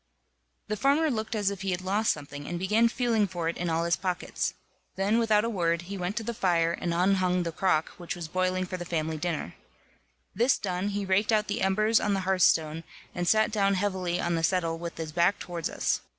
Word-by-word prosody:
The 215 - -1
farmer 285 +7 +2
looked 220 -1 -3
as 205 -2 +1
if 195 -2 -6
he 195 - -2
had 180 0 -1
lost 205 +4 +2
something, 145 -1 -7
and 175 - -3
began 210 +6 +3
feeling 230 -4 +1
for 175 -3 -2
it 170 - -3
in 175 0 -2
all 165 +1 +1
his 170 0 +2
pockets. 180 -2 -2 0.4
Then, 200 +4 +2
without 220 -2 +3
a - - 0
word, 170 -6 0
he 195 +3 -6
went 180 +1 -3
to 230 - -1
the 235 - -3
fire, 175 -7 +2
and 170 0 -3
unhung 180 0 +2
the 170 - -3
crock 160 -2 +1
which 175 - -4
was 170 -2 -6
boiling 185 +2 0
for 185 0 -5
the 175 - -5
family 160 -2 -2
dinner. 155 - -3 0.8
This 240 +6 +3
done, 185 0 -2
he 205 0 -2
raked 195 +3 +2
out 215 -1 +3
the 205 +3 -2
embers 215 +4 +3
on 205 -1 0
the 195 - -1
hearthstone, 165 -4 +2 0.3
and 175 -1 -2
sat 215 +3 +3
down 200 -2 +2
heavily 185 -2 -1
on 175 - 0
the 165 - 0
settle 165 -1 +1
with 170 0 -6
his 160 -1 -5
back 175 +4 +2
towards 170 -2 -4
us. - - -1
185 Hz, 220 wpm, -28 LUFS, 170-205 Hz, 0.8 s, began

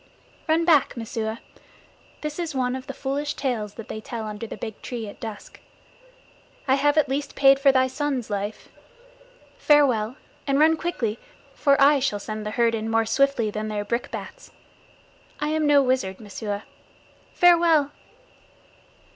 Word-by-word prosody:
"Run 325 +1 +2
back, 305 -7 +3
Messua. 225 0 -4 0.8
This 300 +2 -5
is 325 -4 -3
one 250 -1 0
of 260 0 -7
the 275 - -5
foolish 285 +2 -3
tales 220 -7 -3
they 220 -1 -7
tell 225 0 -6
under 215 +1 -6
the - - -8
big 220 0 -7
tree 235 -3 -5
at 205 - -11
dusk. 220 -2 -8 1.1
I 260 - +4
have 290 +2 +2
at 300 -2 +4
least 275 +1 -3
paid 275 0 +5
for 275 0 +5
thy 260 -1 +3
son's 260 -2 -2
life. 205 +1 -4 0.9
Farewell; 255 -6 +3 0.3
and 275 0 +2
run 315 +2 +5
quickly, 245 -11 -3 0.3
for 280 -2 +2
I 285 +1 +6
shall 260 -6 0
send 215 +1 -6
the 210 - -5
herd 235 -1 +3
in 220 0 -2
more 225 0 +2
swiftly 240 -2 +1
than 215 +1 -4
their 210 -1 -3
brickbats. 240 - -5 0.9
I 295 +1 -1
am 310 -1 +1
no 285 -1 +5
wizard, 255 -8 -1
Messua. 205 -1 -5 0.7
Farewell!" 335 -5 +4
260 Hz, 155 wpm, -24 LUFS, 220-290 Hz, 1.1 s, I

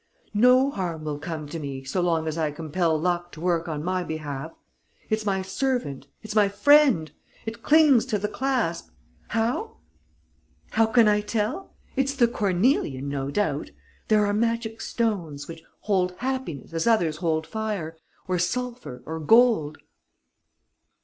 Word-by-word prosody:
No 250 +5 +5
harm 170 - -4
will 150 -1 -4
come 160 0 -5
to 165 - -5
me 135 -3 -6
so 135 +8 -1
long 165 -2 +1
as 155 - -2
I 160 -2 0
compel 160 +2 -1
luck 175 +1 -1
to - - -10
work 170 -1 0
on 150 -2 -3
my 185 +1 -1
behalf. 155 -2 -5 0.6
It's 215 -1 0
my 190 -1 0
servant, 240 - -2 0.2
it's 215 -1 -6
my 205 -2 +5
friend. 210 - +4 0.3
It 230 +1 -6
clings 290 -4 +5
to 220 -5 0
the 205 +1 -2
clasp. 245 -11 -1 0.4
How? 235 - -1 0.9
How 225 0 +3
can 225 0 +5
I 210 0 +3
tell? 220 - -3 0.2
It's 270 +1 0
the 245 -3 +4
cornelian, 185 - 0
no 140 -1 -3
doubt.... 205 +8 -1 0.4
There 215 -1 +4
are 205 - 0
magic 230 0 -1
stones, 175 -11 -2
which 165 -1 -9 0.2
hold 185 -3 +1
happiness, 250 - -4
as 165 +6 -1
others 175 -10 +2
hold 160 -2 0
fire, 200 -4 -4 0.3
or 180 -1 0
sulphur, 240 - -3
or 160 +1 -5
gold...." 215 -5 +4
190 Hz, 150 wpm, -25 LUFS, 160-230 Hz, 0.9 s, No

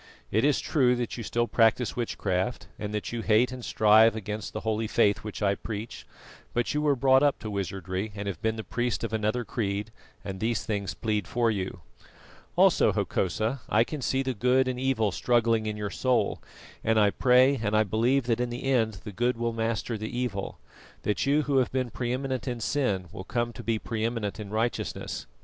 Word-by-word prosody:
It 110 +3 +2
is 145 -1 +3
true 125 -5 +2
that 120 -1 -3
you 115 - -5
still 120 +2 0
practise 115 +1 +2
witchcraft, 110 -2 -2
and 105 -1 -4
that 105 -1 -3
you 120 -1 -3
hate 115 +3 +3
and 130 -1 -7
strive 110 +1 +5
against 105 -1 -5
the 110 - -5
holy 110 0 -1
Faith 105 -2 +3
which 105 0 -6
I 100 -1 +3
preach; 110 +2 -6 0.5
but 120 0 0
you 150 - 0
were 145 -2 +3
brought 130 +1 +4
up 145 -1 +3
to 110 - -6
wizardry 95 +1 -3
and 100 0 -5
have 95 -5 -4
been 110 0 0
the 110 - -5
priest 120 0 -2
of 115 - -3
another 110 +3 0
creed, 105 -1 -2 0.3
and 95 -1 -5
these 110 0 -1
things 100 -3 -2
plead 105 -3 -1
for 120 -1 +1
you. 95 -3 -4 0.7
"Also, - - +5
Hokosa, 110 +8 -1
I 110 - +4
can 150 +3 -6
see 135 +1 0
the 130 -1 -1
good 125 +4 +2
and 125 -1 -2
evil 125 -6 +1
struggling 115 +1 +2
in 105 0 -3
your 105 -1 -3
soul, 130 -1 +1 0.4
and 110 0 +3
I 105 -1 +4
pray 130 +4 +4
and 105 -1 +1
I 110 - +5
believe 115 +6 +2
that 115 -1 0
in 125 0 0
the 120 +2 -5
end 110 -7 +1
the 105 - -6
good 120 +4 0
will 115 0 -1
master 115 0 -2
the 110 +1 -4
evil; 120 -6 -3 0.5
that 105 +5 0
you 150 +2 +3
who 140 -1 +1
have 130 - +2
been 130 -2 -1
pre 120 -1 -3
eminent 130 0 -2
in 120 -2 -2
sin 110 -8 0
will 95 - -7
come 120 +3 -2
to - - -8
be 115 -1 0
pre 110 0 -4
eminent 115 -3 -2
in 105 -2 -6
righteousness. 110 - -2
115 Hz, 210 wpm, -27 LUFS, 105-125 Hz, 0.7 s, strive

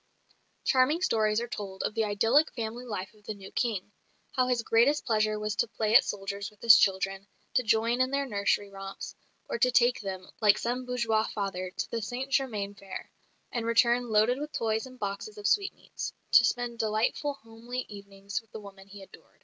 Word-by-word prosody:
Charming 290 +7 +3
stories 215 - +2
are 240 - -4
told 195 -4 -6
of - - -1
the 225 -1 +1
idyllic 225 +9 +3
family 235 +1 -4
life 200 -5 -5
of 210 -1 -23
the 215 - -4
new 195 -1 -11
King; 210 -5 -2 0.4
how 255 -1 +1
his 245 -2 +1
greatest 255 +8 +3
pleasure 215 -2 +1
was 210 0 -2
to 235 - +2
"play 220 0 0
at 260 - +9
soldiers" 200 0 -4
with 210 - -25
his 230 -2 +8
children, 195 -2 +1 0.3
to - - +4
join 230 +2 +2
in 255 - +2
their 280 +1 0
nursery 200 -3 0
romps, 195 0 -8 0.3
or - - -3
to 250 - +4
take 245 -1 +3
them, 190 -2 -6
like 210 -2 +6
some 250 +2 -2
bourgeois 230 -3 +1
father, 195 -3 -3
to - - -5
the 230 - -2
Saint 250 +5 -4
Germain 215 -7 0
fair, 195 -1 -9 0.4
and 230 -2 -2
return 235 +1 +3
loaded 220 +4 +3
with 300 +1 -5
toys 220 +2 -1
and 255 0 -13
boxes 205 0 -5
of 205 - -9
sweetmeats, 400 - -1 0.2
to - - +8
spend 240 -1 -1
delightful 220 +6 0
homely 230 +1 -7
evenings 200 +2 -6
with 225 - -31
the - - -7
woman 195 -1 -13
he 200 0 -11
adored. - - -18
220 Hz, 195 wpm, -29 LUFS, 200-245 Hz, 0.4 s, at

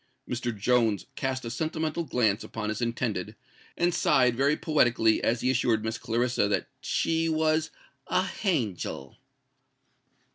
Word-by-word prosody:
Mr. 120 0 -2
Jones 115 -1 +2
cast 130 -2 -2
a 115 - -4
sentimental 160 +3 -2
glance 115 -7 +1
upon 110 -1 -4
his 110 +2 -3
intended, 115 -4 -2 0.4
and 175 0 +2
sighed 125 -6 +3
very 140 +4 +2
poetically 120 -8 +2
as 115 0 +1
he 130 - +2
assured 115 -3 +1
Miss 110 +1 -3
Clarissa 120 -1 +1
that 100 - 0
she 165 0 0
was 155 0 +1 0.4
"a - - +2
hangel." 115 - -2
125 Hz, 135 wpm, -27 LUFS, 110-155 Hz, 0.4 s, sighed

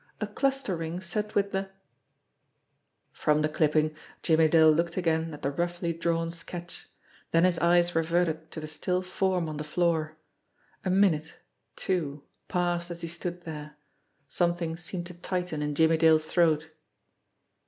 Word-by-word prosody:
A 215 - -1
cluster 270 -1 -1
ring 165 +1 -4
set 210 +4 -3
with 200 0 +2
the 195 0 -2 1.4
From 150 0 +1
the - - +3
clipping 155 0 +2 0.3
Jimmie 160 -1 +4
Dale 160 0 +6
looked 170 +3 0
again 165 -2 +1
at 150 - -10
the 140 - 0
roughly 175 +2 -2
drawn 165 0 -1
sketch, 170 +1 -9 0.4
then 165 +1 +3
his 180 -2 +3
eyes 175 +1 +4
reverted 165 -1 0
to 160 - -7
the 155 - -6
still 180 +4 -1
form 185 -2 0
on 155 -1 -5
the 150 - -3
floor. 155 -1 0 0.7
A 190 - -1
minute, 180 -5 +2 0.4
two, 150 -6 -2 0.2
passed 175 -1 0
as 170 0 -6
he - - -2
stood 175 +1 -5
there. 150 -2 -8 0.5
Something 170 0 0
seemed 175 +1 -5
to 180 - -8
tighten 180 -2 -3
in 150 0 -2
Jimmie 160 +1 +4
Dale's 160 -1 +5
throat. 160 -2 +2
170 Hz, 155 wpm, -28 LUFS, 160-175 Hz, 1.4 s, Dale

